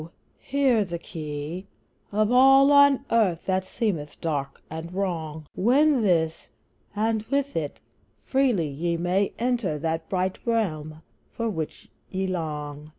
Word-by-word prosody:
here 265 -5 +2
the 175 -3 -5
key 155 +2 -6 0.4
Of 215 +2 +1
all 270 +2 +7
on 285 -3 +6
earth 200 -8 +2
that 190 0 0
seemeth 175 - -3
dark 140 -4 -3
and 160 +2 -7
wrong; 160 -5 -3
Win 270 +6 +4
this 165 -5 +1 0.5
and, 220 +1 +1
with 280 0 0
it, 150 -3 -3 0.5
freely 250 - +2
ye 170 +4 -2
May 180 +4 +1
enter 235 -9 0
that 160 +1 -3
bright 185 0 -1
realm 160 -10 -2 0.3
for 230 -1 -3
which 160 -5 -5 0.2
ye 190 0 -2
long. 150 -4 -4
185 Hz, 130 wpm, -25 LUFS, 160-230 Hz, 0.5 s, all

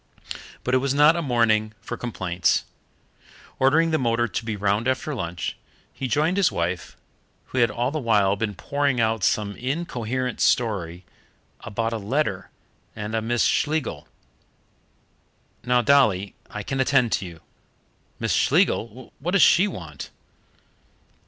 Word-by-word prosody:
But 125 - -1
it 130 - +5
was 135 +1 -1
not 150 +3 +6
a 170 - -1
morning 115 -6 +2
for 100 - -6
complaints. 95 -7 0 1.0
Ordering 160 +5 +3
the 160 - +2
motor 120 -1 +1
to 115 - -4
be 110 -1 -3
round 105 +3 0
after 130 +4 -1
lunch, 90 -7 -4 0.4
he 135 - -4
joined 155 +8 +1
his 200 - +3
wife, 85 +1 -3 0.5
who 130 - -3
had 120 -2 +4
all 120 +4 -1
the 155 - -2
while 105 -6 +2
been 105 0 -3
pouring 140 +2 -1
out 110 -2 +1
some 100 +1 +1
incoherent 130 -3 -3
story 90 -7 0 0.5
about 115 +2 -3
a 115 - -2
letter 105 -3 -1 0.5
and 105 +1 -5
a 110 - 0
Miss 120 +1 +1
Schlegel. 155 +1 0 1.6
"Now, 125 0 +2
Dolly, 110 -9 +3 0.2
I 105 - -6
can 135 +4 -3
attend 130 -3 +3
to 100 - 0
you. 85 -2 -12 0.8
Miss - - 0
Schlegel? 115 +3 +1
What 175 +6 -3
does 200 - +6
she 185 +4 +5
want?" 80 - -8
120 Hz, 145 wpm, -24 LUFS, 105-135 Hz, 1.6 s, not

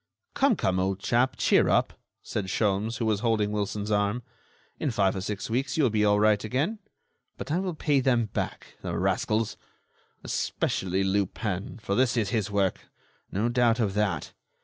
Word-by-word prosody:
"Come, 275 -4 +3
come, 95 - 0
old 95 +1 0
chap, 120 +6 +1
cheer - - +4
up!" - - +2 0.3
said 100 - -3
Sholmes, 105 +3 0
who 115 - -1
was 110 -2 +1
holding 110 -2 +1
Wilson's 105 0 -2
arm, 105 +3 +1 0.6
"in 150 - 0
five 100 -5 +1
or 95 - -3
six 100 0 -4
weeks 130 +8 -1
you 155 - +3
will 125 - +3
be 105 -1 +2
all 105 0 +4
right 105 -1 +3
again. 145 - -1 0.6
But - - -6
I 170 - +2
will 185 -3 -2
pay 145 -2 +2
them 125 -3 +2
back... 105 - -5
the - - -3
rascals! 110 0 0 0.7
Especially 95 +1 -1
Lupin, 95 +1 -1
for 110 -3 -3
this 125 +2 +2
is 105 -4 +1
his 105 -1 0
work... 100 -2 +1 0.5
no 105 +5 0
doubt 120 -1 +2
of 105 -4 +1
that. 100 -7 -1
105 Hz, 175 wpm, -27 LUFS, 100-120 Hz, 0.7 s, cheer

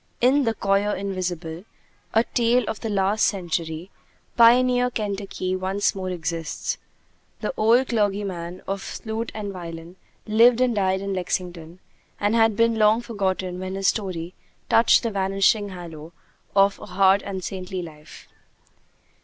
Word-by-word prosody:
In 265 +3 +4
'The 225 -1 0
Choir 200 +1 +1
Invisible,' 180 -4 -4 0.5
a 225 - +5
tale 240 +1 +2
of 220 - -3
the 225 - -4
last 200 +1 +1
century, 170 -2 -2 0.4
pioneer 245 +1 +5
Kentucky 200 -4 -3
once 190 +2 0
more 185 -1 -4
exists. 165 -2 -3 0.6
The - - -2
old 235 +4 +3
clergyman 195 -5 -2
of 195 0 -2
'Flute 220 +2 -5
and 205 -2 -4
Violin' 170 0 -8 0.3
lived 230 +2 +5
and 255 -1 +3
died 190 -2 +1
in 200 0 -3
Lexington, 175 -2 -4 0.4
and 205 +1 +1
had 225 -2 +4
been 230 0 +2
long 215 +2 +4
forgotten 190 -5 -2
when 185 0 -4
his 195 0 +2
story 180 -5 -3 0.4
"touched 230 +2 +5
the 230 - -1
vanishing 195 +1 +2
halo 170 -3 -9 0.4
of 195 0 +4
a - - -10
hard 195 +1 +4
and 190 -2 -5
saintly 185 -1 -5
life." 155 -2 -12
195 Hz, 140 wpm, -24 LUFS, 180-220 Hz, 0.6 s, a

